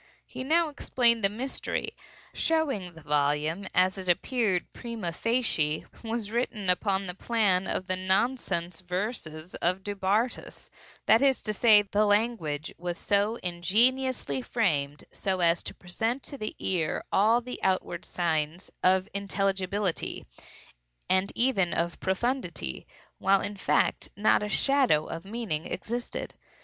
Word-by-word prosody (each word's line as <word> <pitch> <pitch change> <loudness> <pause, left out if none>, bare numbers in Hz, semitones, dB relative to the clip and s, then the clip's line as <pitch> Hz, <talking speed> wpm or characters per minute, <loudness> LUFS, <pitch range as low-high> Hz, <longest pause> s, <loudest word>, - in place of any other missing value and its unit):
He - - -7
now 325 +4 +3
explained 240 -5 +2
the 195 - +4
mystery; 250 +6 -3 0.4
showing 315 - 0
that 175 - -14
the 160 - -13
volume, 150 +5 +1
as 185 +1 +3
it 185 -1 -5
appeared 195 0 +1
prima 230 -7 -4
facie, 175 -9 0 0.2
was 225 -2 -3
written 220 -5 0
upon 195 +1 +1
the 180 - -4
plan 195 -3 +2
of 185 - -2
the 185 0 -1
nonsense 185 -3 -1
verses 180 -3 -4
of 185 +2 0
Du 205 - -3
Bartas; 205 +6 -1 0.3
that 225 - +5
is 275 -2 +3
to 215 - -2
say, 210 -1 +6
the 205 +1 +1
language 205 -9 0
was 175 +3 -6
ingeniously 205 - +2
framed 145 - 0
so 190 -1 -2
as 170 -1 +3
to - - -7
present 225 +9 -2
to 285 - -6
the 215 -6 -5
ear 170 -5 0
all 220 +4 +4
the 250 +1 -7
outward 185 -2 0
signs 165 0 -2
of 185 +1 +3
intelligibility, 195 -1 -1 0.9
and 185 +1 +3
even 215 -8 +2
of 170 0 -1
profundity, 190 - -2 0.3
while 195 0 +4
in 205 - -3
fact 195 - +1
not 205 0 +4
a 210 - -3
shadow 255 - +3
of 165 +2 -6
meaning 200 -7 -3
existed. 240 +2 -4
195 Hz, 135 wpm, -28 LUFS, 175-230 Hz, 0.9 s, say